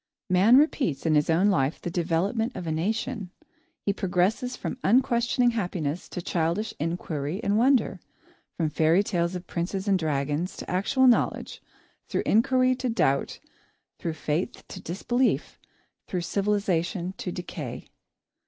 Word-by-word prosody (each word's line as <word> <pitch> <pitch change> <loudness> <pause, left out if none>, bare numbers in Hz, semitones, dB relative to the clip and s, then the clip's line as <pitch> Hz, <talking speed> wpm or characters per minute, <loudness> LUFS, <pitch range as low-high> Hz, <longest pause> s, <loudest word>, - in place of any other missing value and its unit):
Man 200 +7 +6
repeats 270 - +1
in 160 - +3
his 150 +1 +3
own 180 +6 +4
life 140 -5 +1
the 175 - -5
development 190 +8 0
of 175 - -5
a 160 - -2
nation. 210 +5 -2 0.6
He 200 - +2
progresses 195 +7 0
from 260 - -5
unquestioning 240 +2 +3
happiness 180 -7 -3
to 180 - -5
childish 170 +6 -1
inquiry 160 0 -3
and 200 - +1
wonder, 255 +3 +3 0.6
from 160 -3 0
fairy 165 +6 +3
tales 175 -3 -1
of 180 0 -6
princes 190 +4 -3
and 195 -2 +3
dragons 150 +2 -1
to - - -7
actual 200 +9 +2
knowledge; 245 -2 +2 0.5
through - - -1
inquiry 255 +3 +3
to 255 -1 -2
doubt, 140 - +1 0.6
through 165 - -2
faith 160 +7 -3
to 185 - -8
disbelief, 240 +9 -1 0.5
through 180 - -2
civilisation 190 -2 0
to 180 - -3
decay. 145 -8 -6
185 Hz, 140 wpm, -26 LUFS, 165-225 Hz, 0.6 s, Man